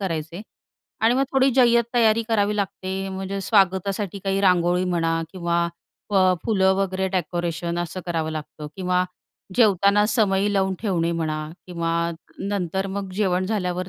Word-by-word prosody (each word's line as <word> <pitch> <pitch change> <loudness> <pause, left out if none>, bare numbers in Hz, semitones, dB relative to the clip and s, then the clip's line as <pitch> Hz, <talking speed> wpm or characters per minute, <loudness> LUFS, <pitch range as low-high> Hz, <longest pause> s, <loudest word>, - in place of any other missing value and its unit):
करायचे 165 0 -4 0.6
आणि 225 +2 +4
मग 270 - +2
थोडी 270 0 +4
जय्यत 235 -2 +5
तयारी 230 -1 +4
करावी 210 -1 +1
लागते 190 -1 -3
म्हणजे 190 +1 -4
स्वागतासाठी 195 -1 +1
काही 195 0 0
रांगोळी 180 -1 +3
म्हणा 165 -2 0
किंवा 170 -2 0 0.5
अ, 185 -2 +4
फुलं 190 -4 +3
वगैरे 190 -1 -1
डेकोरेशन 175 -1 -2
असं 175 +2 -4
करावं 165 -2 -1
लागतं 155 -1 -7
किंवा 180 -1 +1 0.5
जेवताना 205 -2 +4
समई 205 -2 +2
लावून 190 -1 +1
ठेवणे 175 -6 0
म्हणा 160 -2 -2 0.3
किंवा 170 -2 -3 0.5
नंतर 195 -1 -2
मग 195 0 -4
जेवण 185 -2 +1
झाल्यावर 185 -3 -2
190 Hz, 140 wpm, -23 LUFS, 175-200 Hz, 0.6 s, जय्यत